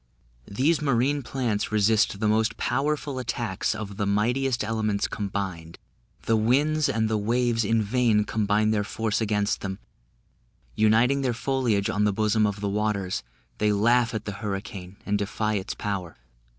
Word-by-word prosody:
These 145 Hz, +11 st, +1 dB
marine 140 Hz, +1 st, +1 dB
plants 120 Hz, -6 st, -2 dB
resist 105 Hz, -1 st, +2 dB
the 110 Hz, -, +1 dB
most 110 Hz, +1 st, +1 dB
powerful 140 Hz, +1 st, -1 dB
attacks 115 Hz, -4 st, -2 dB
of 105 Hz, -3 st, -6 dB
the 100 Hz, -2 st, -1 dB
mightiest 120 Hz, +5 st, +1 dB
elements 110 Hz, -2 st, 0 dB
combined; 95 Hz, -5 st, -4 dB, 0.5 s
the 115 Hz, -, +2 dB
winds 145 Hz, +7 st, +2 dB
and 110 Hz, -1 st, +1 dB
the 110 Hz, -1 st, 0 dB
waves 115 Hz, +1 st, +1 dB
in 110 Hz, +1 st, +2 dB
vain 110 Hz, -1 st, +2 dB
combine 105 Hz, 0 st, +1 dB
their 105 Hz, -1 st, +1 dB
force 110 Hz, +1 st, -2 dB
against 105 Hz, -1 st, 0 dB
them; 95 Hz, -1 st, -4 dB, 1.0 s
uniting 115 Hz, +6 st, +3 dB
their 125 Hz, -3 st, 0 dB
foliage 115 Hz, -4 st, 0 dB
on 105 Hz, 0 st, +1 dB
the 105 Hz, -, +2 dB
bosom 110 Hz, +1 st, +2 dB
of 100 Hz, 0 st, -4 dB
the 100 Hz, -, -1 dB
waters, 100 Hz, -2 st, -1 dB, 0.4 s
they 105 Hz, 0 st, +3 dB
laugh 115 Hz, +3 st, +3 dB
at 110 Hz, -, -4 dB
the 105 Hz, -, -3 dB
hurricane 95 Hz, -2 st, -5 dB
and 105 Hz, 0 st, 0 dB
defy 105 Hz, +1 st, -1 dB
its 100 Hz, 0 st, -3 dB
power. 95 Hz, -5 st, -4 dB
110 Hz, 155 wpm, -26 LUFS, 105-120 Hz, 1.0 s, uniting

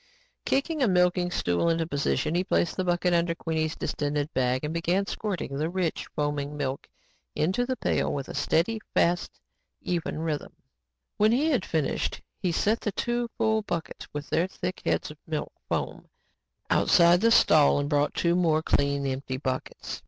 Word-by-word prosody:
Kicking 300 Hz, +3 st, 0 dB
a 255 Hz, -, +4 dB
milking 180 Hz, -1 st, +2 dB
stool 90 Hz, -, +1 dB
into 165 Hz, 0 st, +1 dB
position, 145 Hz, -1 st, 0 dB
he 175 Hz, +2 st, +1 dB
placed 175 Hz, 0 st, 0 dB
a -, -, +2 dB
bucket 175 Hz, 0 st, +1 dB
under 170 Hz, 0 st, +2 dB
Queenie's 160 Hz, -2 st, -2 dB
distended 145 Hz, 0 st, -2 dB
bag 130 Hz, +1 st, +1 dB
and 150 Hz, +1 st, -2 dB
began 175 Hz, +4 st, +1 dB
squirting 190 Hz, -10 st, -4 dB
the 155 Hz, +2 st, 0 dB
rich, 180 Hz, -2 st, -2 dB
foaming 145 Hz, 0 st, -2 dB
milk 135 Hz, -2 st, -3 dB, 0.5 s
into 190 Hz, +10 st, +1 dB
the 260 Hz, -, 0 dB
pail -, -, 0 dB
with 140 Hz, -2 st, -3 dB
a -, -, -7 dB
steady, 170 Hz, +9 st, +1 dB
fast 175 Hz, +1 st, +1 dB, 0.4 s
and -, -, -9 dB
even 170 Hz, -3 st, -2 dB
rhythm. 155 Hz, -2 st, -3 dB, 0.6 s
When 215 Hz, +1 st, +4 dB
he 290 Hz, +7 st, +2 dB
had 255 Hz, -10 st, +1 dB
finished, 155 Hz, -4 st, -1 dB, 0.2 s
he 180 Hz, -, 0 dB
set 215 Hz, +7 st, +1 dB
the 210 Hz, -, -1 dB
two 240 Hz, +2 st, -1 dB
full 220 Hz, 0 st, +2 dB
buckets 170 Hz, -6 st, -5 dB
with 145 Hz, 0 st, -5 dB
their 170 Hz, +3 st, +2 dB
thick 180 Hz, -1 st, -5 dB
heads -, -, 0 dB
of 150 Hz, -, -14 dB
milk 155 Hz, -2 st, -3 dB, 0.2 s
foam, -, -, -3 dB, 0.6 s
outside 170 Hz, +1 st, +5 dB
the 230 Hz, -, +5 dB
stall 155 Hz, -11 st, +5 dB
and 145 Hz, 0 st, 0 dB
brought 145 Hz, 0 st, +1 dB
two 170 Hz, 0 st, +2 dB
more 160 Hz, -3 st, +2 dB
clean, 140 Hz, -2 st, +1 dB
empty 130 Hz, -1 st, -3 dB
buckets. 130 Hz, -1 st, -4 dB
165 Hz, 175 wpm, -27 LUFS, 145-185 Hz, 0.6 s, outside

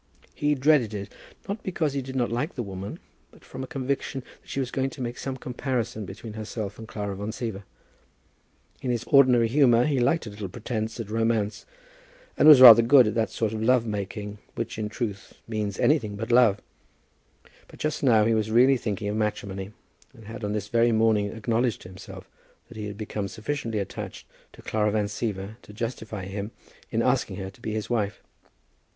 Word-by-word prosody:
He 150 Hz, 0 st, +1 dB
dreaded 130 Hz, -6 st, +3 dB
it, 100 Hz, -1 st, -6 dB, 0.3 s
not 205 Hz, +2 st, -4 dB
because 160 Hz, -6 st, -1 dB
he 140 Hz, -, -1 dB
did 130 Hz, 0 st, -8 dB
not 120 Hz, -3 st, 0 dB
like 130 Hz, +9 st, -2 dB
the 120 Hz, -, -2 dB
woman, 95 Hz, -1 st, -6 dB, 0.3 s
but -, -, -20 dB
from 130 Hz, -, -7 dB
a -, -, -6 dB
conviction 135 Hz, -2 st, -3 dB, 0.2 s
that -, -, -21 dB
she -, -, -3 dB
was 130 Hz, -2 st, -2 dB
going 135 Hz, 0 st, 0 dB
to -, -, -12 dB
make 120 Hz, -1 st, -3 dB
some 135 Hz, -1 st, -4 dB
comparison 125 Hz, -4 st, -3 dB
between 110 Hz, +5 st, -8 dB
herself 110 Hz, -1 st, -5 dB
and 110 Hz, -, -8 dB
Clara 100 Hz, -2 st, -4 dB
Van 100 Hz, +2 st, -5 dB
Siever. 110 Hz, -3 st, -4 dB, 1.2 s
In 130 Hz, -, -3 dB
his 120 Hz, -1 st, 0 dB
ordinary 125 Hz, -4 st, +5 dB
humour 120 Hz, -2 st, +4 dB
he 145 Hz, -4 st, +1 dB
liked 135 Hz, +6 st, +2 dB
a 105 Hz, -, -7 dB
little 100 Hz, -2 st, -6 dB
pretence 110 Hz, +1 st, -4 dB
at 110 Hz, -2 st, -5 dB
romance, 115 Hz, -2 st, 0 dB, 0.7 s
and -, -, +4 dB
was 150 Hz, -4 st, +10 dB
rather 120 Hz, -2 st, +12 dB
good 125 Hz, +2 st, +6 dB
at 105 Hz, -, 0 dB
that 110 Hz, 0 st, 0 dB
sort 110 Hz, -2 st, -2 dB
of 110 Hz, -, -3 dB
love 125 Hz, +1 st, +3 dB
making 105 Hz, 0 st, -5 dB, 0.2 s
which -, -, -4 dB
in 105 Hz, -1 st, -2 dB
truth 105 Hz, -4 st, -5 dB
means 105 Hz, -3 st, -3 dB
anything 115 Hz, -9 st, +2 dB
but 110 Hz, +3 st, -4 dB
love. 120 Hz, -4 st, +5 dB, 1.1 s
But -, -, -15 dB
just 155 Hz, 0 st, -2 dB
now 115 Hz, -6 st, +5 dB
he 115 Hz, -, +3 dB
was 110 Hz, -1 st, 0 dB
really 125 Hz, +4 st, +5 dB
thinking 105 Hz, -2 st, -3 dB
of 105 Hz, +1 st, -2 dB
matrimony, 100 Hz, -2 st, -3 dB, 0.4 s
and 115 Hz, -3 st, -14 dB
had 115 Hz, +2 st, -8 dB
on 105 Hz, 0 st, -1 dB
this 105 Hz, -1 st, -3 dB
very 115 Hz, +2 st, +3 dB
morning 110 Hz, -2 st, +3 dB
acknowledged 115 Hz, +1 st, -1 dB
to 90 Hz, -, -10 dB
himself 95 Hz, 0 st, -11 dB, 0.4 s
that 120 Hz, -, -11 dB
he 105 Hz, -1 st, -4 dB
had 100 Hz, 0 st, -7 dB
become 105 Hz, -1 st, -4 dB
sufficiently 115 Hz, +1 st, -4 dB
attached 100 Hz, -, -6 dB, 0.3 s
to -, -, -15 dB
Clara 105 Hz, -1 st, +1 dB
Van 105 Hz, 0 st, +1 dB
Siever 105 Hz, -1 st, -4 dB
to -, -, -14 dB
justify 110 Hz, -3 st, -5 dB
him 100 Hz, +2 st, -5 dB, 0.4 s
in -, -, 0 dB
asking -, -, +1 dB
her 95 Hz, -1 st, -6 dB
to 100 Hz, -, -22 dB
be 110 Hz, -2 st, -4 dB
his 110 Hz, -1 st, -3 dB
wife. 110 Hz, -4 st, -2 dB
110 Hz, 195 wpm, -26 LUFS, 105-125 Hz, 1.2 s, rather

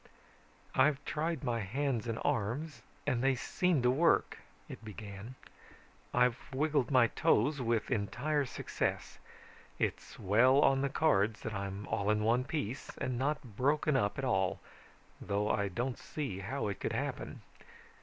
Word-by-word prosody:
"I've 140 Hz, +1 st, +3 dB
tried 160 Hz, -1 st, -2 dB
my 120 Hz, -3 st, 0 dB
hands 120 Hz, +3 st, -1 dB
and 115 Hz, -1 st, -2 dB
arms 125 Hz, +9 st, -1 dB, 0.2 s
and 130 Hz, -4 st, 0 dB
they 135 Hz, 0 st, +3 dB
seem 170 Hz, +1 st, 0 dB
to 125 Hz, -, +5 dB
work," 160 Hz, +6 st, +2 dB, 0.3 s
it -, -, -9 dB
began. 105 Hz, +2 st, -8 dB, 0.8 s
"I've 125 Hz, 0 st, +3 dB
wiggled 145 Hz, -1 st, +1 dB
my 130 Hz, -4 st, +6 dB
toes 130 Hz, +5 st, +2 dB
with 115 Hz, 0 st, 0 dB
entire 135 Hz, +7 st, 0 dB
success. -, -, -3 dB, 0.6 s
It's -, -, -3 dB
well 120 Hz, +7 st, +4 dB
on 135 Hz, -1 st, +4 dB
the 140 Hz, -, +1 dB
cards 110 Hz, -8 st, +2 dB
that 110 Hz, -, -4 dB
I'm 100 Hz, 0 st, -4 dB
all 105 Hz, -2 st, -1 dB
in 105 Hz, 0 st, +2 dB
one 120 Hz, +3 st, +2 dB
piece 135 Hz, -4 st, -4 dB
and 125 Hz, -2 st, -2 dB
not 145 Hz, +3 st, 0 dB
broken 145 Hz, +4 st, +2 dB
up 100 Hz, -6 st, +1 dB
at 135 Hz, -, -2 dB
all, 95 Hz, -7 st, +1 dB, 0.6 s
though 105 Hz, +1 st, 0 dB
I 100 Hz, -, +1 dB
don't 120 Hz, +7 st, -3 dB
see 135 Hz, -11 st, -4 dB
how 115 Hz, +6 st, -3 dB
it 100 Hz, -, -4 dB
could -, -, -2 dB
happen. -, -, -4 dB
125 Hz, 150 wpm, -33 LUFS, 105-140 Hz, 0.8 s, my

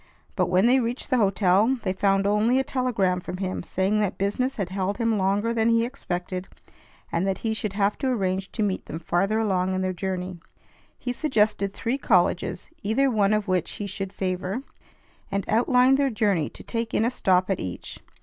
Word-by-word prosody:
But, 180 Hz, -3 st, +1 dB
when 185 Hz, +3 st, +3 dB
they 255 Hz, +2 st, +5 dB
reached 245 Hz, +3 st, -3 dB
the 255 Hz, -, +4 dB
hotel, 200 Hz, +4 st, +3 dB
they 185 Hz, -3 st, 0 dB
found 195 Hz, 0 st, +2 dB
only 210 Hz, +5 st, +3 dB
a 265 Hz, -, +2 dB
telegram 230 Hz, -10 st, 0 dB
from 180 Hz, -, -6 dB
him 185 Hz, -1 st, -3 dB
saying 190 Hz, +4 st, 0 dB
that 205 Hz, -3 st, -1 dB
business 230 Hz, +7 st, 0 dB
had 195 Hz, -4 st, -3 dB
held 195 Hz, +1 st, -2 dB
him 230 Hz, -1 st, +1 dB
longer 205 Hz, +3 st, +1 dB
than 225 Hz, 0 st, +2 dB
he 230 Hz, 0 st, +3 dB
expected 185 Hz, -7 st, -4 dB, 0.6 s
and 170 Hz, +3 st, 0 dB
that 195 Hz, -, 0 dB
he 220 Hz, -, +1 dB
should 215 Hz, -2 st, -3 dB
have 200 Hz, 0 st, +1 dB
to 270 Hz, -, -1 dB
arrange 190 Hz, -6 st, -1 dB
to 215 Hz, -, -1 dB
meet 195 Hz, -2 st, -2 dB
them 160 Hz, -, -5 dB
farther 175 Hz, +6 st, 0 dB
along 190 Hz, -4 st, +1 dB
in 185 Hz, -, -1 dB
their 185 Hz, 0 st, -1 dB
journey. 185 Hz, -1 st, -4 dB, 0.6 s
He 245 Hz, -, -3 dB
suggested 215 Hz, -8 st, +1 dB
three 250 Hz, +4 st, -2 dB
colleges, 180 Hz, -4 st, +1 dB
either 260 Hz, +6 st, +2 dB
one 205 Hz, -3 st, +2 dB
of 215 Hz, -1 st, +1 dB
which 185 Hz, -3 st, 0 dB
he 205 Hz, -, -5 dB
should 195 Hz, -1 st, -5 dB
favor, 190 Hz, +5 st, -3 dB, 0.7 s
and 195 Hz, -1 st, -1 dB
outlined 250 Hz, +4 st, +4 dB
their 280 Hz, -1 st, +3 dB
journey 205 Hz, -, +1 dB
to -, -, -12 dB
take 230 Hz, -1 st, -3 dB
in 220 Hz, -, +3 dB
a 240 Hz, -, +1 dB
stop 185 Hz, -6 st, +2 dB
at 190 Hz, -, 0 dB
each. 90 Hz, -1 st, -6 dB
200 Hz, 200 wpm, -25 LUFS, 185-230 Hz, 0.7 s, they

